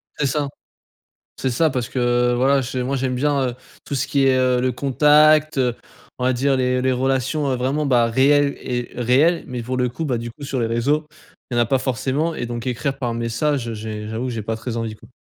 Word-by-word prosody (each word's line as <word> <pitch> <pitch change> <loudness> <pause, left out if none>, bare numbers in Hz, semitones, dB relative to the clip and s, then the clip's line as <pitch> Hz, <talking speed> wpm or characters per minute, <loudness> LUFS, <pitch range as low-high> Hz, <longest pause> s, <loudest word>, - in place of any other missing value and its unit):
C'est 145 - -1
ça. 145 +2 0 0.9
C'est 130 - -1
ça 160 +7 +2
parce 125 -3 -2
que 120 -1 +1
voilà, 135 +3 +3
j'ai 130 0 -3
moi 135 +2 -1
j'aime 130 -1 -1
bien, 140 -1 +1
heu, 120 - -5 0.3
tout - - -5
ce - - -1
qui 140 -1 +2
est 130 -1 +4
heu 130 -1 +2
le 130 +1 +1
contact, 150 +3 +4
heu, 125 -2 +1 0.4
on 125 - -2
va 130 - +3
dire 135 +2 +1
les 125 0 +1
les 130 0 +1
relations, 135 +3 0
heu, 130 - 0
vraiment, 135 +4 -1
bah, 120 -3 +3
réelles 140 +4 +3
et 120 -1 -3
réelles. 135 +8 +2
Mais 125 -2 -5
pour 130 +2 -3
le 125 -1 +1
coup, 130 +7 -5
bah, 130 -5 0
du 120 +1 -5
coup 140 +5 -11
sur 135 -2 -2
les 115 - +1
réseaux, 140 +7 0 0.4
il 120 - -2
y - - +2
en - - +5
a - - 0
pas 135 +3 +2
forcément 135 +6 -1
et 120 - -4
donc 120 0 -5
écrire 125 +2 -2
par 120 -4 -2
message, 115 +3 -1
heu, 115 - -4
j'ai, 105 0 -6
j'avoue 110 +3 -3
que 125 - -3
j'ai 115 -2 -4
pas 110 +2 -3
très 115 +1 -5
envie 115 -2 -3
quoi. - - -17
130 Hz, 245 wpm, -21 LUFS, 120-140 Hz, 0.9 s, en